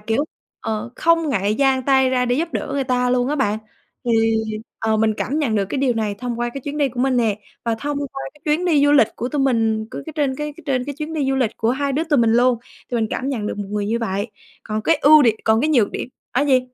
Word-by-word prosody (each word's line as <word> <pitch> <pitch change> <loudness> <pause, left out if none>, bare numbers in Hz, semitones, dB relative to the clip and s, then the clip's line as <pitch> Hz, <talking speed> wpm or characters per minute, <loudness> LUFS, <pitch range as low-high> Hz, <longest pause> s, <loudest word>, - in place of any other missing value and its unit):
kiểu, 225 +7 0 0.4
ờ, 220 +1 -3
không 330 -1 +2
ngại 205 -5 +1
dang 265 +1 +2
tay 265 0 +3
ra 250 -1 +2
để 245 0 +1
giúp 325 +4 0
đỡ - - -3
người 280 -1 0
ta 250 -1 +1
luôn 250 0 +1
á 295 - 0
bạn. 215 -6 +1 0.5
Thì, 240 - +1 0.7
ờ, 220 -1 +1
mình 220 0 +2
cảm 285 +4 -1
nhận 270 -8 0
được 205 -2 +2
cái 275 - -2
điều 260 -3 +2
này 215 -2 -1
thông 245 -1 -4
qua 240 - 0
cái 275 - -4
chuyến 285 +3 -5
đi 285 -2 +2
của 245 -1 -5
mình 260 0 +2
nè. 220 -4 +1 0.3
Và 230 -1 +1
thông 285 +5 -3
qua 275 -1 -5
cái 295 - -22
chuyến 305 +4 +1
đi 305 -5 +3
du 290 - +4
lịch 255 -7 +5
của 245 - -3
tụi 290 +1 -1
mình 225 -4 +1
cứ - - -6
cái 315 - -6
trên 280 -3 +1
cái 300 +1 -4
trên 255 -3 0
cái 285 +1 -5
chuyến 310 +1 -4
đi 295 -4 -1
du 270 - +1
lịch 255 -5 +1
của 225 0 +1
hai 280 +2 -1
đứa 305 +4 0
tụi 305 -4 +2
mình 230 -1 +4
luôn 245 0 +3 0.3
thì - - -3
mình 225 -2 +1
cảm 265 - -2
nhận 235 -7 -2
được - - -4
một 205 - -4
người 205 -1 -1
như 225 +3 0
vậy. 205 -1 -2 0.3
Còn 215 0 -3
cái 325 +8 +3
ưu 305 +1 +8
đì 240 - +6
còn 220 0 +3
cái 300 - +1
nhược 240 -9 +3
điểm - - -5 0.2
á 270 +4 +2
gì? 265 -3 +4
255 Hz, 280 wpm, -21 LUFS, 225-285 Hz, 0.7 s, ưu